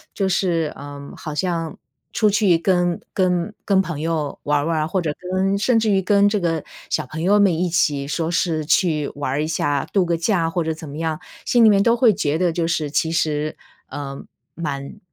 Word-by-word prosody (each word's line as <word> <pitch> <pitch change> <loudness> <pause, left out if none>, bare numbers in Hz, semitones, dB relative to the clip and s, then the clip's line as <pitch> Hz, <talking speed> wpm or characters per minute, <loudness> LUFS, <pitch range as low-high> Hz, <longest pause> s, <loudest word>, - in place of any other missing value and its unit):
就 195 - 0
是， 170 -4 0
呃， 140 0 -9
好 155 -2 -6
像 165 -1 -2 0.4
出 215 -2 +3
去 200 -4 +3
跟 175 -1 +1
跟 185 +1 0
跟 195 -1 +4
朋 165 -5 -5
友 155 -2 -2
玩 145 0 +2
儿 145 - -1
玩 165 -1 0
儿， 155 - -1
或 185 +2 0
者 155 -3 -1 0.2
跟 195 +1 +1
甚 230 +2 +3
至 220 -1 +1
于 195 - +3
跟 200 +1 +3
这 210 -2 0
个 165 -3 -1 0.2
小 - - -1
朋 155 +5 -7
友 200 +5 +4
们 200 -3 +4
一 180 0 +1
起 145 -4 +1
说 165 +1 -1
是 165 -3 0
去 155 -3 +2
玩 145 -2 -2
儿 150 +2 0
一 - - -2
下， 145 -3 0
度 190 -3 +2
个 170 -1 +1
假 170 -1 +1
或 170 0 -1
者 160 - -1
怎 155 -1 -9
么 140 - -8
样， 160 0 -2 0.2
心 240 -1 +3
里 220 - +8
面 200 -1 +5
都 230 +1 +4
会 235 -4 +4
觉 160 -6 0
得 180 0 +2
就 165 0 -1
是 155 -3 -1
其 160 +2 0
实， 155 -2 0 0.3
呃， 140 -1 -6 0.3
蛮 140 +1 -5
165 Hz, 235 characters per minute, -21 LUFS, 155-190 Hz, 0.4 s, 里